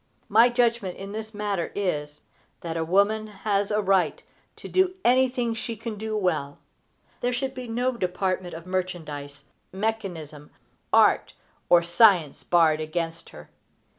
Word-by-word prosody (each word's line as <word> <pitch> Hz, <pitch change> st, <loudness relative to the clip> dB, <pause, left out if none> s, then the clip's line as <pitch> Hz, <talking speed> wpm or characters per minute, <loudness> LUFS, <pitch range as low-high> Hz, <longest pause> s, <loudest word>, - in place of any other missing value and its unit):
My 225 Hz, +4 st, +6 dB
judgment 235 Hz, -6 st, 0 dB
in 195 Hz, +1 st, -7 dB
this 220 Hz, +1 st, -6 dB
matter 205 Hz, -5 st, -2 dB
is, 150 Hz, -7 st, -2 dB, 0.4 s
that 165 Hz, -1 st, -5 dB
a 165 Hz, -, 0 dB
woman 200 Hz, +5 st, +2 dB
has 205 Hz, -1 st, -1 dB
a 210 Hz, 0 st, +1 dB
right 185 Hz, -6 st, +1 dB, 0.3 s
to -, -, -10 dB
do 370 Hz, 0 st, +2 dB
anything 250 Hz, -1 st, +3 dB
she 230 Hz, +1 st, -4 dB
can 225 Hz, 0 st, -6 dB
do 215 Hz, +1 st, -3 dB
well. 155 Hz, -8 st, -1 dB, 0.6 s
There 245 Hz, -, 0 dB
should 260 Hz, +2 st, -2 dB
be 255 Hz, -2 st, -7 dB
no 245 Hz, +3 st, 0 dB
department 185 Hz, -3 st, -2 dB
of 165 Hz, +1 st, -9 dB
merchandise, 155 Hz, -6 st, -5 dB, 0.3 s
mechanism, 185 Hz, -8 st, -4 dB, 0.4 s
art, -, -, +4 dB, 0.4 s
or 175 Hz, -1 st, +6 dB
science 175 Hz, -4 st, +4 dB
barred 160 Hz, -3 st, +3 dB
against 165 Hz, +1 st, -4 dB
her. 75 Hz, -, -13 dB
195 Hz, 140 wpm, -25 LUFS, 165-225 Hz, 0.6 s, My